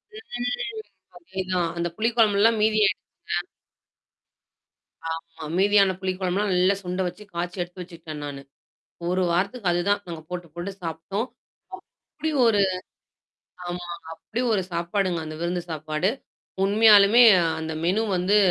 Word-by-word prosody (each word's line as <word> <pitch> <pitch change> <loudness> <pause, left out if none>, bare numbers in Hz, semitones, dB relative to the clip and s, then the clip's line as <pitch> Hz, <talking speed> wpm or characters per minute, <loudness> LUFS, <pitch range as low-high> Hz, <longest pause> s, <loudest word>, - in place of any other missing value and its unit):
ம். 430 - -4 0.4
அதேதான். 185 -1 -2
அந்த 170 - 0
புளி 225 +1 +2
குழம்புல்லாம் 220 0 +4
மீதி 215 0 +3
ஆய்டுச்சிங்க. - - -1 2.0
ஆமா. 165 0 -6
மீதியான 195 0 +4
புளி 190 -1 -1
கொழம்புலாம் 190 +2 0
நல்லா 185 +2 +3
சுண்ட 180 +1 -2
வச்சு 180 +4 -8
காய்ச்சி 175 +2 -3
எடுத்து 180 +1 -6
வச்சுக்கிட்டேன் 165 -4 -8
நானு. 140 -1 -6 0.7
1 185 +1 +1
வாரத்துக்கு 195 +4 0
அதுதான் 200 +4 +1
நாங்க 165 -2 -7
போட்டு, 180 -1 -5
போட்டு 175 +3 -5
சாப்டோம். 170 +7 -3 0.9
அப்டி 315 - -1 0.2
ஒரு 215 -3 +4 1.1
ஆமாங்க. 175 -1 -6
அப்படி 220 +8 -4
ஒரு 195 - +2
சாப்பாடுங்க. 175 +1 0
அந்த 155 - -6
விருந்து 175 0 -1
சாப்பாடு. 155 +3 -1 0.6
உண்மையாலுமே 210 +2 +7 0.4
அந்த 160 0 -4
மெனு 190 +6 +2
வந்து, 185 +4 +2
185 Hz, 125 wpm, -25 LUFS, 170-205 Hz, 2.0 s, உண்மையாலுமே